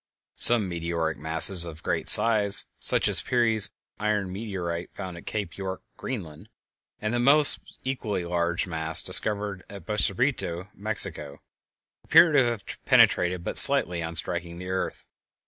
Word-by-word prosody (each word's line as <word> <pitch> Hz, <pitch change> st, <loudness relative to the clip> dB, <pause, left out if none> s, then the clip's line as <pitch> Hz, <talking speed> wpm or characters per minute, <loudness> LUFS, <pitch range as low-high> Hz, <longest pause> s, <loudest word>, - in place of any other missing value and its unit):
Some 115 Hz, -5 st, +5 dB
meteoric 85 Hz, -2 st, -5 dB
masses 80 Hz, +3 st, +3 dB
of 80 Hz, -2 st, -9 dB
great -, -, +1 dB
size, 105 Hz, -3 st, +4 dB
such -, -, +5 dB
as -, -, +2 dB
Peary's 115 Hz, -4 st, 0 dB, 0.3 s
iron 105 Hz, -3 st, -3 dB
meteorite 90 Hz, -5 st, -7 dB
found 95 Hz, -3 st, -9 dB
at 85 Hz, -, -15 dB
Cape 100 Hz, -5 st, -7 dB
York, 95 Hz, -1 st, -8 dB
Greenland, 85 Hz, -12 st, -9 dB, 0.5 s
and 110 Hz, +2 st, -5 dB
the 120 Hz, -, -2 dB
almost 140 Hz, +4 st, +3 dB
equally 110 Hz, -9 st, -5 dB
large 85 Hz, +3 st, -3 dB
mass 80 Hz, -2 st, +1 dB
discovered 105 Hz, -3 st, -1 dB
at 100 Hz, -1 st, -13 dB
Bacubirito, 100 Hz, -3 st, -3 dB
Mexico, 95 Hz, -9 st, -3 dB, 0.6 s
appear 165 Hz, +1 st, +4 dB
to 145 Hz, -3 st, +2 dB
have 120 Hz, -3 st, -5 dB, 0.2 s
penetrated 90 Hz, 0 st, +1 dB
but -, -, +6 dB
slightly 85 Hz, -1 st, +4 dB
on 85 Hz, 0 st, -7 dB
striking 85 Hz, +1 st, 0 dB
the 90 Hz, +1 st, -9 dB
earth. 95 Hz, -, -6 dB
95 Hz, 140 wpm, -23 LUFS, 85-110 Hz, 0.6 s, but